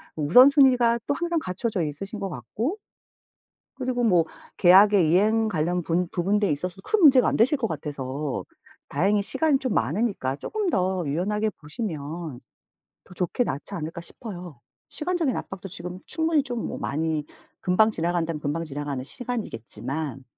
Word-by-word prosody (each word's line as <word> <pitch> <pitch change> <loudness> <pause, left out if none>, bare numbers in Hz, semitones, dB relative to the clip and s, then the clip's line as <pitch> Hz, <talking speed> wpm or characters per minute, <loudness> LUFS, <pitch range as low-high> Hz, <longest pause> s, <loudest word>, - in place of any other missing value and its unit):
우선순위가 250 - +6
또 - - +2
항상 340 +2 -1
갖춰져 195 - -2
있으신 195 +8 -5
것 195 -1 -3
같고. 225 - -4 1.0
그리고 255 -2 -1
뭐 180 -7 +4 0.3
계약의 190 -2 +6
이행 215 +5 +3
관련 175 -1 0
분 175 +2 0
부분에 200 +3 +1
있어서 175 +5 -4
큰 435 - +1
문제가 270 -7 +7
안 - - +1
되실 255 +6 +3
것 240 - 0
같아서 145 - -4 0.4
다행히 205 +3 +2
시간이 290 +7 +2
좀 260 -5 -1
많으니까 200 - 0
조금 420 - -2
더 185 - 0
유연하게 210 +9 0
보시면 155 - -5 0.7
더 - - -15
좋게 180 +7 0
낫지 150 - -4
않을까 165 -1 -5
싶어요. 175 - -8 0.3
시간적인 330 -5 -1
압박도 190 0 -6
지금 180 +1 -7
충분히 320 -1 +1
좀 245 -4 -4
뭐 - - -5
많이 155 +1 -1 0.4
금방 215 +4 +3
지나간다면 165 -3 -1
금방 150 +3 -2
지나가는 145 -3 -4
시간이겠지만. 145 - -5
185 Hz, 335 characters per minute, -25 LUFS, 160-240 Hz, 1.0 s, 문제가